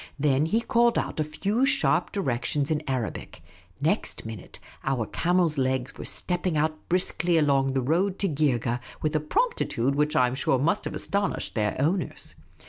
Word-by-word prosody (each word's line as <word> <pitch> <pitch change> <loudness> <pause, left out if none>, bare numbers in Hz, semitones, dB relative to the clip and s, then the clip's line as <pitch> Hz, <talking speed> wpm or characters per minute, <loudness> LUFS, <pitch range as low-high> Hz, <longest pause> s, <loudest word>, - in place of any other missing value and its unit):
Then 145 +1 +2
he 225 +7 +1
called 235 -1 +3
out - - -2
a - - +3
few 200 - -1
sharp 275 0 +2
directions 140 - -1
in 155 -1 +1
Arabic. 125 -5 -4 0.4
Next - - -1
miiuite, 110 -4 -8 0.3
our 130 -4 0
camels' 170 - +1
legs 130 0 -1
were - - -8
stepping 180 -2 0
out 155 +1 +2 0.2
briskly 175 -1 +1
along 135 -3 +2
the 135 -1 0
road 180 +8 +1
to 200 - 0
Geergeh 130 - 0 0.2
with 155 0 0
a - - +3
promptitude 155 - 0
which 150 +2 +1
I 125 - +5
'm 125 - -1
sure 130 0 +1
must 145 +6 0
have - - -4
astoni.shed 200 0 -1
their 105 -1 -1
owners. 170 +6 -1
150 Hz, 170 wpm, -26 LUFS, 130-180 Hz, 0.4 s, I